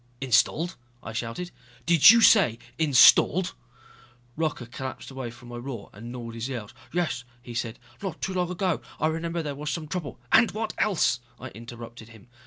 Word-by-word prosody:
"Installed!" 135 Hz, +7 st, +2 dB, 0.3 s
I 110 Hz, -, -7 dB
shouted. 115 Hz, +11 st, -4 dB, 0.3 s
"Did 170 Hz, 0 st, +8 dB
you 230 Hz, +1 st, +8 dB
say 180 Hz, -, +6 dB, 0.2 s
installed?" 160 Hz, +4 st, +6 dB, 0.8 s
Rocca 155 Hz, -6 st, -2 dB
collapsed 130 Hz, +3 st, -7 dB
away 130 Hz, -2 st, -5 dB
from 120 Hz, +1 st, -13 dB
my 120 Hz, -, -7 dB
roar 120 Hz, -4 st, -7 dB
and 115 Hz, +4 st, -9 dB
gnawed 120 Hz, -2 st, -7 dB
his 115 Hz, +3 st, -4 dB
nails. 115 Hz, -6 st, -6 dB, 0.2 s
"Yes 170 Hz, -8 st, -1 dB
" 120 Hz, -, -31 dB
he 120 Hz, -, -9 dB
said, 115 Hz, -1 st, -3 dB, 0.2 s
"not 190 Hz, -5 st, -5 dB
too 190 Hz, -, -3 dB
long 180 Hz, -1 st, 0 dB
ago. 180 Hz, -1 st, -1 dB, 0.2 s
I -, -, +1 dB
remember 165 Hz, +1 st, -1 dB
there 145 Hz, -2 st, -3 dB
was 150 Hz, +2 st, -5 dB
some 155 Hz, 0 st, -3 dB
trouble...." 150 Hz, -7 st, -5 dB
"And 235 Hz, -, +6 dB
what 220 Hz, +1 st, -3 dB
else!" 170 Hz, -, +2 dB, 0.2 s
I -, -, -7 dB
interrupted 115 Hz, 0 st, -10 dB
him. 115 Hz, 0 st, -16 dB
135 Hz, 180 wpm, -26 LUFS, 120-170 Hz, 0.8 s, Did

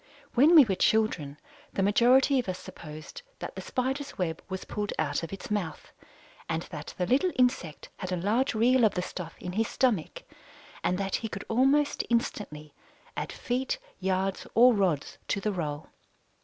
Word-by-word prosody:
When 290 Hz, +8 st, +6 dB
we 300 Hz, -5 st, +10 dB
were 200 Hz, -, 0 dB
children, 180 Hz, -9 st, +1 dB, 0.4 s
the 195 Hz, -, 0 dB
majority 255 Hz, +7 st, +5 dB
of 240 Hz, -, -3 dB
us 185 Hz, -, -2 dB
supposed 155 Hz, -, -10 dB, 0.2 s
that -, -, -6 dB
the -, -, -6 dB
Spider's 265 Hz, +3 st, -3 dB
web 165 Hz, -3 st, -2 dB
was 190 Hz, -1 st, -5 dB
pulled 210 Hz, 0 st, -3 dB
out 145 Hz, -2 st, 0 dB
of 165 Hz, -, -6 dB
its 195 Hz, +2 st, -7 dB
mouth, 180 Hz, -7 st, -3 dB, 0.6 s
and 165 Hz, 0 st, -1 dB
that 150 Hz, -2 st, -7 dB
the 180 Hz, -, 0 dB
little 275 Hz, -, +3 dB
insect 250 Hz, -, 0 dB
had 185 Hz, -, -5 dB
a -, -, +1 dB
large 220 Hz, +9 st, +1 dB
reel 245 Hz, +3 st, +4 dB
of 215 Hz, -, +4 dB
the 180 Hz, -, -1 dB
stuff 180 Hz, -2 st, -7 dB
in 180 Hz, -, -5 dB
his 220 Hz, +4 st, 0 dB
stomach, 225 Hz, -11 st, 0 dB, 0.6 s
and 180 Hz, -, +1 dB
that 195 Hz, 0 st, -1 dB
he 225 Hz, -, -4 dB
could 195 Hz, -2 st, -7 dB
almost 270 Hz, +5 st, +3 dB
instantly 180 Hz, -10 st, -2 dB, 0.4 s
add -, -, -3 dB
feet, 260 Hz, -, -2 dB, 0.2 s
yards, 190 Hz, 0 st, -1 dB
or 245 Hz, +2 st, +7 dB
rods 185 Hz, -9 st, 0 dB
to 205 Hz, -, 0 dB
the 210 Hz, +2 st, -1 dB
roll. 155 Hz, -5 st, -4 dB
200 Hz, 175 wpm, -28 LUFS, 175-250 Hz, 0.6 s, we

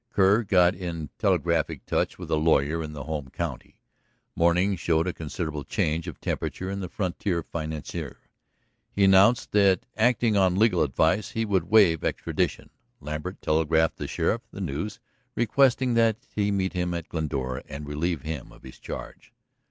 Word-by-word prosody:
Kerr 100 Hz, +1 st, +4 dB
got 90 Hz, -4 st, +4 dB
in 85 Hz, -4 st, -5 dB
telegraphic -, -, 0 dB
touch -, -, -1 dB
with -, -, -8 dB
a -, -, +4 dB
lawyer 80 Hz, 0 st, +2 dB
in 75 Hz, -1 st, -6 dB
the 75 Hz, -3 st, -6 dB
home 75 Hz, -2 st, -4 dB
county. -, -, -6 dB, 0.6 s
Morning 90 Hz, +4 st, +3 dB
showed 85 Hz, -2 st, +1 dB
a 90 Hz, -, -1 dB
considerable 75 Hz, -1 st, -4 dB
change 80 Hz, +5 st, -1 dB
of 85 Hz, -, -7 dB
temperature 95 Hz, +1 st, -3 dB
in 100 Hz, -, -3 dB
the 90 Hz, -3 st, -5 dB
frontier 90 Hz, -2 st, -2 dB
financier. 80 Hz, -2 st, -5 dB, 0.7 s
He 100 Hz, -, +1 dB
announced 95 Hz, +5 st, +5 dB
that, 100 Hz, -2 st, +3 dB
acting 115 Hz, -1 st, +2 dB
on 95 Hz, -2 st, +3 dB
legal 105 Hz, -4 st, +3 dB
advice, 80 Hz, -, +1 dB
he 115 Hz, 0 st, 0 dB
would 95 Hz, -5 st, +1 dB
waive 100 Hz, -7 st, +5 dB
extradition. -, -, -2 dB, 0.3 s
Lambert 75 Hz, +6 st, -6 dB
telegraphed 80 Hz, +1 st, +2 dB
the -, -, -4 dB
sheriff 115 Hz, -, 0 dB
the -, -, -10 dB
news, 90 Hz, +4 st, -4 dB, 0.4 s
requesting 125 Hz, +1 st, +3 dB
that 115 Hz, -2 st, +3 dB, 0.2 s
he 105 Hz, -1 st, 0 dB
meet 95 Hz, -2 st, 0 dB
him 90 Hz, -1 st, -1 dB
at 85 Hz, -2 st, -5 dB
Glendora 70 Hz, -5 st, -3 dB
and 70 Hz, +2 st, -7 dB
relieve 75 Hz, 0 st, -2 dB
him 75 Hz, -5 st, -5 dB
of -, -, -17 dB
his 65 Hz, -, -12 dB
charge. -, -, -8 dB
85 Hz, 160 wpm, -26 LUFS, 80-100 Hz, 0.7 s, announced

